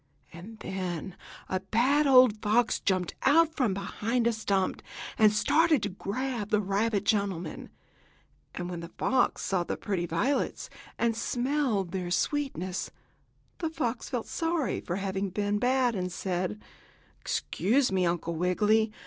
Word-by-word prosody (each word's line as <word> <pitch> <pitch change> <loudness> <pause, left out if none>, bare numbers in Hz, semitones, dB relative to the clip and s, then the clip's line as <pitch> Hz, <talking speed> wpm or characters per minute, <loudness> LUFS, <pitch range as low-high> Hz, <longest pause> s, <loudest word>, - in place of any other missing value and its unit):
And 190 +7 -10
then 185 -2 -4 0.3
a 185 - -1
bad 255 +10 +2
old 255 -5 +6
fox 225 +3 +2
jumped 185 -2 0
out 320 +3 +4
from 240 -9 +1
behind 220 +4 -1
a 235 - +3
stump, 200 -3 -1 0.3
and 215 -1 +5
started 305 +5 +3
to 205 - 0
grab 215 +3 -3
the 210 -2 +3
rabbit 205 +1 0
gentleman. 195 -6 -1 0.8
But 175 - -4
when 175 -1 -5
the 170 0 -8
fox 255 -1 +1
saw 185 -3 0
the - - -4
pretty 180 -4 -2
violets 240 +13 -1 0.3
and 230 -1 +1
smelled 240 - 0
their 180 -1 -3
sweetness, 190 - -1 0.7
the 325 - -1
fox 255 -7 -3
felt 245 -4 -2
sorry 330 -4 -1
at 175 - 0
having 195 0 -2
been 205 +2 -1
bad 250 0 +2
and 180 -3 -3
said: 175 - -2 0.6
"Excuse 240 - +1
me, 190 -1 +1
Uncle 170 -1 -1
Wiggily. 210 +6 +2
210 Hz, 140 wpm, -28 LUFS, 185-250 Hz, 0.8 s, old